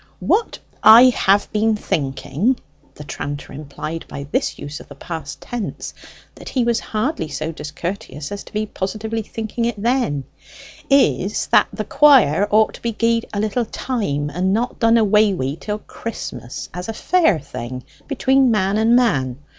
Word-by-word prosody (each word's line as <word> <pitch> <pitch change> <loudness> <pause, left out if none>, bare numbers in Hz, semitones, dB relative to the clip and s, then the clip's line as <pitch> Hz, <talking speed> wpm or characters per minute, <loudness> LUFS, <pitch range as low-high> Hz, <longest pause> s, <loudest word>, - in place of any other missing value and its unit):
"What 450 - +1 0.2
I 230 +4 +9
have 200 -3 +2
been 215 +1 +2
thinking" 155 - -1 0.4
the 150 - -9
tranter 145 0 -6
implied 155 +3 -6
by 140 - -7
this - - -1
use 145 +1 -7
of - - -13
the 140 - -12
past 160 0 -7
tense 240 -4 -5 0.4
that - - -10
he 255 - 0
was 235 -1 +1
hardly 215 - -2
so 155 +2 -4
discourteous 155 -1 -6
as 200 0 -5
to - - -14
be 215 0 -1
positively 215 +3 -4
thinking 225 +2 -4
it 235 -3 -2
then 230 - 0 0.7
"is 200 - +2
that - - +5
the - - -4
quire 215 - +5
ought 215 +1 +3
to - - -12
be 235 -1 -2
gie'd 230 +1 +1
a 205 - -3
little 215 +3 0
time, 145 - -2
and 185 +3 0
not 240 +4 -1
done 230 0 +4
away 210 -2 +4
wi' 135 -4 -2
till 210 +6 -4
Christmas, 210 - -7
as 180 +4 -6
a - - -2
fair 330 - +2
thing 125 -3 -7 0.2
between 270 -1 +3
man 200 -2 +1
and 225 +2 +4
man. 135 - +2
210 Hz, 165 wpm, -20 LUFS, 150-230 Hz, 0.7 s, I